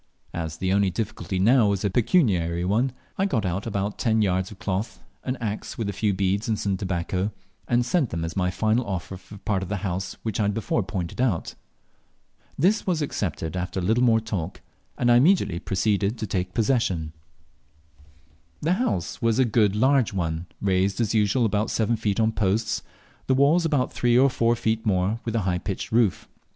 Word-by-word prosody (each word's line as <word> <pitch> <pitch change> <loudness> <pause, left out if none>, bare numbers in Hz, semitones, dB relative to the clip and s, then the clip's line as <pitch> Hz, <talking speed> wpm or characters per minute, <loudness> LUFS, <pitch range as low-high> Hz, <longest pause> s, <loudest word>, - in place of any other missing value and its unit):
As 80 -2 -4
the 95 +1 0
only 100 -1 +3
difficulty 95 0 -3
now 115 +4 +5
was 100 0 0
a - - +2
pecuniary 95 - +2
one, 115 +8 +1 0.3
I 195 - +3
got 115 - 0
out 95 +4 -2
about 100 -1 -2
ten 110 -2 +2
yards 95 -1 0
of 105 - -11
cloth, 105 +1 -3 0.2
an 130 - -2
axe, 110 -3 -4
with 110 -3 -2
a - - -3
few 105 +2 0
beads 100 +2 0
and 110 -2 0
some 100 -1 -1
tobacco, 90 +1 -2 0.4
and 120 0 +2
sent 140 -1 +1
them 85 0 -3
as 80 - -6
my 90 -2 +1
final 110 +6 +1
offer 95 -1 -4
for 95 +2 -12
the - - -11
part 100 -3 0
of 95 - -5
the 105 - -1
house 95 +1 -3
which 110 -2 -2
I - - +2
had 100 0 0
before 115 +1 0
pointed 95 +1 -4
out. 110 -11 0 1.0
This 195 +9 +2
was 170 -5 +1
accepted 90 - -3
after 90 +1 -3
a - - -3
little 115 +7 +2
more 115 -2 +5
talk, 100 -6 -5 0.4
and 120 -1 +3
I 120 - +7
immediately 145 - +3
proceeded 100 +3 0
to - - -3
take 90 -2 -3
possession. 100 - 0 1.5
The 165 +4 +2
house 90 - -2
was 115 -1 +2
a 130 - +4
good 105 -3 +2
large 130 0 +3
one, 85 -2 -2
raised 95 +1 +1
as 115 -2 +1
usual 110 +3 +2
about 105 0 0
seven 115 +1 +1
feet 105 -2 -1
on 110 0 +3
posts, 105 +1 0 0.5
the 130 - +3
walls 150 +6 +4
about 145 -5 +1
three 120 0 +2
or 135 +1 +5
four 115 -1 +2
feet 110 -1 -1
more, 100 +2 +1
with 115 -1 -2
a 115 - +2
high 90 -2 0
pitched 95 +1 -5
roof. 110 -4 +2
105 Hz, 200 wpm, -25 LUFS, 95-115 Hz, 1.5 s, I